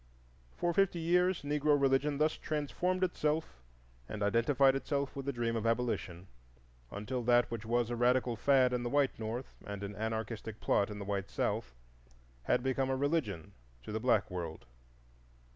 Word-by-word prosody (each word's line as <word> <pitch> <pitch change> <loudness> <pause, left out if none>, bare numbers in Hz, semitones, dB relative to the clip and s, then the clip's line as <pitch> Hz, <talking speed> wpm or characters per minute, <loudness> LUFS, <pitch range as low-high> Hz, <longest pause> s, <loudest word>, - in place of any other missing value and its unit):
For 175 0 0
fifty 195 -1 +2
years 180 +1 +2
Negro 145 0 +2
religion 140 +1 +2
thus 155 +1 +2
transformed 175 +5 -2
itself 155 - -1 0.5
and 105 -1 -3
identified 130 +6 +3
itself 140 0 -2
with 135 0 -6
the - - +1
dream 120 -2 -1
of 115 0 -1
Abolition, 115 -7 -1 0.6
until 115 +5 -4
that 120 0 +3
which 115 -1 -5
was 120 0 +1
a - - -1
radical 125 0 +2
fad 130 +1 +3
in 125 - 0
the 120 - -2
white 140 -1 +1
North 115 +4 -4
and 100 -1 -6
an 100 0 -5
anarchistic 110 0 -4
plot 100 - +2
in 105 - -6
the 100 - -6
white 100 -1 -2
South 65 0 -2 0.7
had - - +2
become 130 0 0
a 130 - 0
religion 135 - -1 0.3
to - - -7
the 110 - -2
black 110 -5 +2
world. 85 -3 -5
125 Hz, 165 wpm, -33 LUFS, 110-145 Hz, 0.7 s, identified